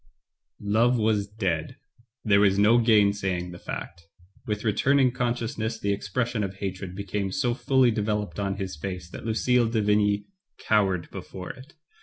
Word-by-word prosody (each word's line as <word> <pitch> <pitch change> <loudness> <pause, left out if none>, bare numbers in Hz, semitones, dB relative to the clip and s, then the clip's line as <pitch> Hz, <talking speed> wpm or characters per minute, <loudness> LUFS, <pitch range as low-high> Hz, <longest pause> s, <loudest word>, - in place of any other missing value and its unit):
Love 115 +5 +2
was 105 -2 +1
dead. 95 -7 -2 0.5
There 100 -2 +5
was 100 -1 +4
no 110 +4 +5
gainsaying 100 -5 +2
the 85 - -10
fact. 85 0 -7 0.4
With 105 -1 -2
returning 130 +5 +3
consciousness 120 -2 -2
the 100 0 0
expres 115 +4 -2
sion 110 -3 -2
of 95 -1 -4
hatred 95 -1 -5
became 100 0 -3
so 125 -4 0
fully 130 0 +3
developed 105 -1 -2
on 100 -1 -1
his 95 -4 -4
face 90 +2 -6
that - - -7
Lucille 120 +2 +2
de 115 -1 0
Vigny 105 0 +2 0.3
cowered 95 -5 +1
before 90 -1 -7
it. 130 +5 -14
105 Hz, 155 wpm, -26 LUFS, 95-115 Hz, 0.5 s, There